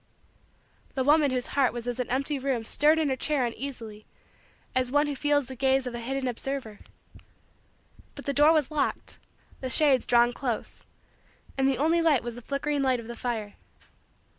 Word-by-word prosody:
The 265 Hz, -, 0 dB
woman 295 Hz, +1 st, +4 dB
whose 255 Hz, -1 st, -1 dB
heart 275 Hz, -3 st, +2 dB
was 240 Hz, 0 st, -6 dB
as 245 Hz, +1 st, -3 dB
an 250 Hz, -, -2 dB
empty 275 Hz, +3 st, -1 dB
room 260 Hz, -4 st, -2 dB
stirred 300 Hz, +7 st, +3 dB
in 315 Hz, -3 st, +1 dB
her 265 Hz, -, 0 dB
chair 275 Hz, -1 st, 0 dB
uneasily 230 Hz, -4 st, -7 dB, 0.7 s
as 255 Hz, -1 st, 0 dB
one 290 Hz, +1 st, +3 dB
who 290 Hz, -1 st, -3 dB
feels 290 Hz, 0 st, +1 dB
the 260 Hz, -, -8 dB
gaze 265 Hz, +1 st, +1 dB
of 250 Hz, -, -5 dB
a 240 Hz, -, -5 dB
hidden 265 Hz, +2 st, -3 dB
observer. 250 Hz, -3 st, -4 dB, 1.4 s
But -, -, -10 dB
the 280 Hz, -, -1 dB
door 295 Hz, +3 st, +5 dB
was 310 Hz, -3 st, +1 dB
locked, 300 Hz, -2 st, -2 dB, 0.4 s
the 260 Hz, -, -4 dB
shades 275 Hz, -2 st, +5 dB
drawn 240 Hz, 0 st, +4 dB
close, 245 Hz, -4 st, -4 dB, 0.7 s
and 270 Hz, 0 st, +2 dB
the 270 Hz, -2 st, +1 dB
only 325 Hz, +4 st, +2 dB
light 305 Hz, -7 st, +3 dB
was 240 Hz, 0 st, -5 dB
the 245 Hz, -, -10 dB
flickering 280 Hz, +3 st, -2 dB
light 260 Hz, -2 st, +1 dB
of 230 Hz, -, -9 dB
the 235 Hz, +1 st, -7 dB
fire. 225 Hz, -4 st, -4 dB
265 Hz, 185 wpm, -27 LUFS, 245-285 Hz, 1.4 s, door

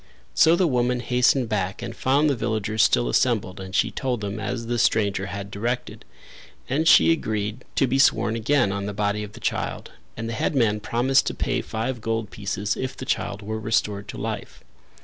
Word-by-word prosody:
So 165 Hz, +1 st, +5 dB
the 185 Hz, +1 st, +2 dB
woman 125 Hz, -4 st, +1 dB
hastened 125 Hz, +1 st, +2 dB
back 100 Hz, 0 st, -2 dB
and 115 Hz, -1 st, -6 dB
found 140 Hz, +5 st, +2 dB
the 140 Hz, -, +2 dB
villagers 110 Hz, -2 st, -1 dB
still -, -, +3 dB
assembled 95 Hz, -, +1 dB
and 95 Hz, 0 st, -7 dB
she -, -, +2 dB
told 125 Hz, -4 st, -2 dB
them 100 Hz, +1 st, -4 dB
as 115 Hz, +1 st, -3 dB
the 120 Hz, +1 st, -1 dB
stranger 100 Hz, -4 st, +1 dB
had 100 Hz, +1 st, -6 dB
directed; 120 Hz, +5 st, -3 dB, 0.6 s
and 155 Hz, +5 st, 0 dB
she 165 Hz, -, +7 dB
agreed 110 Hz, -6 st, -2 dB
to -, -, +3 dB
be 135 Hz, +1 st, 0 dB
sworn 115 Hz, -4 st, +3 dB
again 120 Hz, -1 st, +2 dB
on 100 Hz, 0 st, -3 dB
the 105 Hz, -, -5 dB
body 105 Hz, 0 st, 0 dB
of 105 Hz, 0 st, -9 dB
the 120 Hz, -, -11 dB
child, -, -, -3 dB, 0.3 s
and 115 Hz, 0 st, -4 dB
the 115 Hz, -, -3 dB
headman 110 Hz, -2 st, +1 dB
promised 125 Hz, +5 st, +2 dB
to -, -, -2 dB
pay -, -, -1 dB
five 115 Hz, +2 st, -4 dB
gold 115 Hz, -1 st, -2 dB
pieces 100 Hz, 0 st, -2 dB
if 130 Hz, 0 st, -4 dB
the -, -, -6 dB
child 100 Hz, +1 st, -2 dB
were 110 Hz, +2 st, -4 dB
restored 105 Hz, -2 st, -1 dB
to -, -, -7 dB
life. -, -, -5 dB
110 Hz, 195 wpm, -24 LUFS, 105-125 Hz, 0.6 s, she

